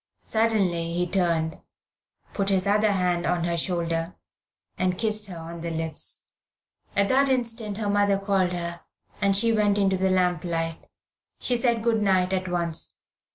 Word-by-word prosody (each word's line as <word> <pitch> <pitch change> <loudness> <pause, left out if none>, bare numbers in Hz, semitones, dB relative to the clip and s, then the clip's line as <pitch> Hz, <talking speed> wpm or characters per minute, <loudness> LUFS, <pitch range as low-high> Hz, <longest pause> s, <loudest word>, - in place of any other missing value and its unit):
Suddenly 195 -7 +1
he 175 +1 0
turned, 170 -3 0 0.7
put 200 -1 0
his 190 -1 +2
other 210 +1 +3
hand 180 -3 0
on 175 -1 0
her 170 0 0
shoulder, 170 0 -2 0.6
and 185 -1 0
kissed 215 0 -1
her 180 -3 -8
on 165 +1 -8
the 170 - -3
lips. 160 -1 0 0.7
At 200 0 +3
that 275 +1 +3
instant 230 -5 -1
her 215 -2 -2
mother 205 -1 +2
called 195 -2 +1
her, 170 -1 -3 0.4
and 200 -1 +3
she 230 +2 +4
went 210 -2 +2
into 195 -2 +2
the 190 +1 +1
lamp 180 -3 +1
light. 165 -2 -3 0.5
She 250 - +2
said 235 -2 +1
good 225 -2 +2
night 190 -2 +2
at 185 0 -1
once. 170 -2 -1
185 Hz, 160 wpm, -25 LUFS, 170-210 Hz, 0.7 s, she